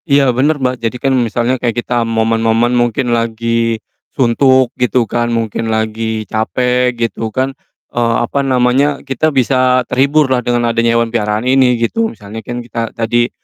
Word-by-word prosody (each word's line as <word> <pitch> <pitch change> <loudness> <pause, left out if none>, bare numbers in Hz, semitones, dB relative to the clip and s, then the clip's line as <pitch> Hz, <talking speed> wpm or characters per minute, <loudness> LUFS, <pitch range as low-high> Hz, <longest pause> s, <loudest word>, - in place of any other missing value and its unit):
Iya 140 -2 +4
bener, 145 +5 +1
Mbak, 130 -2 -2
jadi 115 +2 -2
kan 135 +2 0
misalnya 120 0 0
kayak 120 -1 -1
kita 120 -1 0
momen-momen 115 +1 +1
mungkin 120 0 +1
lagi 115 0 0 0.4
suntuk 130 0 +3
gitu 125 0 +2
kan, 120 +1 -1
mungkin 115 -1 -2
lagi 110 0 -2
capek 125 +4 0
gitu 115 -1 -2
kan, 130 +5 -2 0.4
eee, 115 -1 +1
apa 140 +4 -1
namanya, 135 +2 +1
kita 135 +3 0
bisa 130 -2 +2
terhibur 140 +4 +2
lah 130 -2 0
dengan 120 -1 0
adanya 115 0 +2
hewan 115 -1 -1
peliharaan 105 0 -1
ini, 130 -1 +3
gitu. 225 - 0
Misalnya 105 - -9
kan 120 +2 -6
kita 115 -1 -4
tadi, 120 +1 +1
120 Hz, 160 wpm, -15 LUFS, 115-130 Hz, 0.4 s, Iya